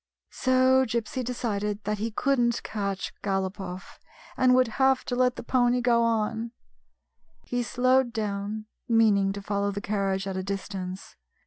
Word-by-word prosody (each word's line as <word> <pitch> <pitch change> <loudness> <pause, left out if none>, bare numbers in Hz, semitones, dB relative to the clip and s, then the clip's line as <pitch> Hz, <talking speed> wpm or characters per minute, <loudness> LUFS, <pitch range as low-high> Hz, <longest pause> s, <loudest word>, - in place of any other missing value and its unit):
So 260 0 +3
Gypsy 235 +1 -2
decided 210 -4 -2
that 210 0 -2
he 225 +2 -1
could 275 +4 +1
n't 235 0 +1
catch 200 -3 -3
Galopoff, 190 -1 -4 0.4
and 255 -1 +4
would 255 -1 +4
have 265 -1 +3
to 245 - -2
let 250 0 +2
the - - -7
pony 245 0 +2
go 240 -1 +3
on. 230 0 0 0.9
He 245 0 -1
slowed 255 +1 +2
down, 210 -1 -3 0.2
meaning 210 -4 +4
to 200 0 -7
follow 200 0 -1
the 200 0 -3
carriage 195 -2 -1
at 195 -1 -4
a - - -1
distance. 190 -1 -5
220 Hz, 150 wpm, -27 LUFS, 200-245 Hz, 0.9 s, and